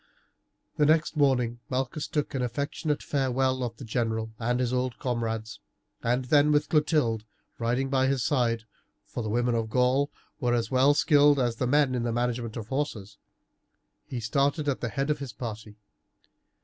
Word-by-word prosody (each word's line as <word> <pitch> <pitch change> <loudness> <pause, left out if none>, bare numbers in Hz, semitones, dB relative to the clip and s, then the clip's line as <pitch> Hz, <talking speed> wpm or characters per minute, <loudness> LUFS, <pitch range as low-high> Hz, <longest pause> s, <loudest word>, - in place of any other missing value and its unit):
The 150 - +4
next 160 +1 +3
morning 125 -5 +2
Malchus 130 +3 -2
took 150 -2 -2
an 135 - -1
affectionate 140 +4 -2
farewell 130 -1 0
of 115 -2 -4
the 130 - -8
general 110 -1 -1
and 120 +2 0
his 125 -1 0
old 125 -1 -1
comrades, 115 -4 -3 0.4
and 125 +2 0
then, 145 +3 +4
with 150 0 +2
Clotilde 150 -8 +2 0.4
riding 120 +3 0
by 135 -1 +2
his 135 -3 +1
side 115 -3 +1 0.4
for - - -5
the 110 - -3
women 120 +2 +1
of 115 -1 -1
the - - -16
Gauls 130 +3 +3 0.3
were 120 -3 +1
as 115 -2 -1
well 135 +3 +4
skilled 145 -2 +5
as 120 -3 0
the 125 - 0
men 140 0 +3
in 125 - 0
the 120 0 -1
management 120 -1 -2
of 110 -1 -7
horses 110 -8 -3 0.9
he 125 - -4
started 140 +7 0
at 140 - 0
the 120 - -2
head 140 +4 -1
of 150 - -1
his 135 -5 -6
party. 110 -2 -7
125 Hz, 175 wpm, -27 LUFS, 115-140 Hz, 0.9 s, skilled